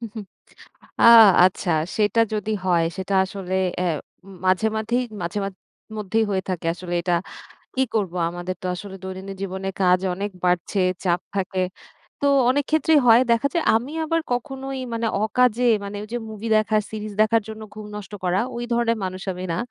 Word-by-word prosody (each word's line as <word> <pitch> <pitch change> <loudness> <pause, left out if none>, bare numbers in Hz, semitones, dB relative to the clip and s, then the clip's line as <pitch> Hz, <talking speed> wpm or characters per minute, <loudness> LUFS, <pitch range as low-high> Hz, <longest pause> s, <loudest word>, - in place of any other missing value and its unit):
হুম, 230 - -6
হুম 215 -2 -6 0.8
আ - - +7 0.4
আচ্ছা, 185 -1 0 0.3
সেটা 210 +1 +2
যদি 215 0 -2
হয়, 175 -3 +3
সেটা 190 +1 -3
আসলে 190 -1 -6 0.3
অ্যা 180 - 0 0.6
মাঝে, 185 +4 +3
মাঝেই 235 +3 0 0.2
মাঝে 170 +3 -3
মা - - -2 0.5
মধ্যেই 215 +2 0
হয়ে 190 -1 0
থাকে 180 -3 -3
আসলে 175 0 -7
এটা, 175 0 0 0.6
কি 265 - +2
করব? 200 -6 0 0.2
আমাদের 175 +1 -5
তো - - -3
আসলে 190 +1 -8
দৈনন্দিন 190 +1 -7
জীবনে 190 0 -4
কাজ 180 0 +4
অনেক 200 +3 -3
বাড়ছে, 180 +2 +1 0.2
চাপ 175 -1 +2 0.2
থাকে। 190 -1 -1 0.6
তো - - +1 0.2
অনেক 285 +3 +2
ক্ষেত্রেই 315 0 +4
হয়, 230 +1 +8
দেখা 235 +4 +3
যায় 340 -2 +1
আমি 240 +6 -1
আবার 330 +1 0
কখনোই 270 +1 -4
মানে 230 0 -1 0.2
অকাজে 245 +2 +2 0.2
মানে 200 +1 -6
ওই - - -9
যে, - - 0
মুভি 220 +1 -6
দেখার 215 0 +2
সিরিজ 215 -1 -6
দেখার 225 +1 +3
জন্য 220 0 -8
ঘুম 215 0 -9
নষ্ট 210 -1 -8
করা, 180 +1 +1 0.2
ওই 240 - -4
ধরনের 235 -1 +1
মানুষ 185 0 -4
আমি 180 +1 -6
না। - - -2
210 Hz, 175 wpm, -23 LUFS, 185-230 Hz, 0.8 s, হয়